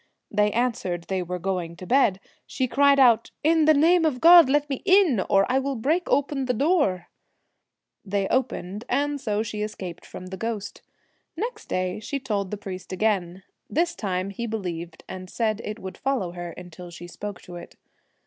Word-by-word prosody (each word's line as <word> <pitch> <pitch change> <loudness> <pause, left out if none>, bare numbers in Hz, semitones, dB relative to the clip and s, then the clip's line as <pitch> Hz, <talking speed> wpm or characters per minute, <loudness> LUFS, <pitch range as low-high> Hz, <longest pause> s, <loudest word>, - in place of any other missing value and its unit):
They 210 0 +2
answered 220 -8 -1
they 190 -1 0
were 180 +1 -4
going 180 -2 -3
to 185 - -10
bed. 235 -5 +3 0.3
She 260 - -1
cried 280 +3 +4
out, 235 -3 +5
' - - -54
In 320 -2 +3
the 310 - +6
name 335 +4 +4
of 300 -6 +1
God 335 -2 +8
let 290 +1 +2
me 270 -3 -4
in, 370 - +4
or 195 0 +4
I 260 +1 +2
will 275 0 -2
break 310 +10 0
open 280 -1 +1
the 250 -1 0
door.' 270 - +1 1.0
They 200 0 -1
29 - - -2
The - - -2
opened, 215 -5 -2
and 285 +2 0
so 215 -4 -1
she 215 -1 -5
escaped 190 -5 -6
from 185 - -9
the 190 +1 -7
ghost. 210 -1 -4 0.5
Twilight. 430 +8 -1
Next - - -17
day 185 +1 -1
she 275 +6 -4
told 205 -7 -2
the 210 - -4
priest 190 -2 -8
again. 190 -2 -1 0.3
This 340 +2 +1
time 190 - -3
he 235 +4 -4
believed, 175 -6 -5
and 185 0 -8
said 220 0 -1
it 210 +1 -5
would 190 -3 -8
follow 260 -10 -1
her 175 0 -6
until 180 0 -10
she 175 0 -10
spoke 200 +2 -7
to 175 -1 -9
it. 175 - -11
215 Hz, 195 wpm, -25 LUFS, 185-275 Hz, 1.0 s, God